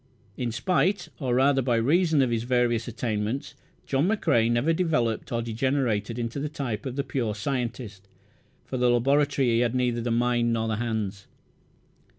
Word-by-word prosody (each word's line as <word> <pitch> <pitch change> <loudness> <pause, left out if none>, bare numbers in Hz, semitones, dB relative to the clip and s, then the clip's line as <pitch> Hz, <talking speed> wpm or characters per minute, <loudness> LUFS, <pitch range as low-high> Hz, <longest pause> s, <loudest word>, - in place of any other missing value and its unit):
In 120 -2 -2
spite, 180 - 0
or 130 -4 0
rather 135 +1 +3
by 120 -2 +1
reason, 155 +5 +3
of 125 - 0
his 115 -1 0
various 120 -1 +1
attainments 115 +1 -3 0.3
John 140 +5 +1
McCrae 145 - +2
never 120 +8 +2
developed, 135 -10 0
or 115 -1 -1
degenerated, 115 -2 -1
into 120 +3 -3
the 150 +2 -3
type 130 -7 -4
of 130 - -5
the 140 - -1
pure 125 -5 -2
scientist. 115 -4 -4 0.6
For 130 - -4
the 125 0 +3
laboratory 135 +2 +2
he 115 0 +2
had 120 0 +1
neither 125 -2 0
the 120 - -2
mind 120 0 +1
nor 115 -1 -1
the 110 -1 -1
hands. 110 -4 -3
120 Hz, 165 wpm, -26 LUFS, 115-135 Hz, 0.6 s, rather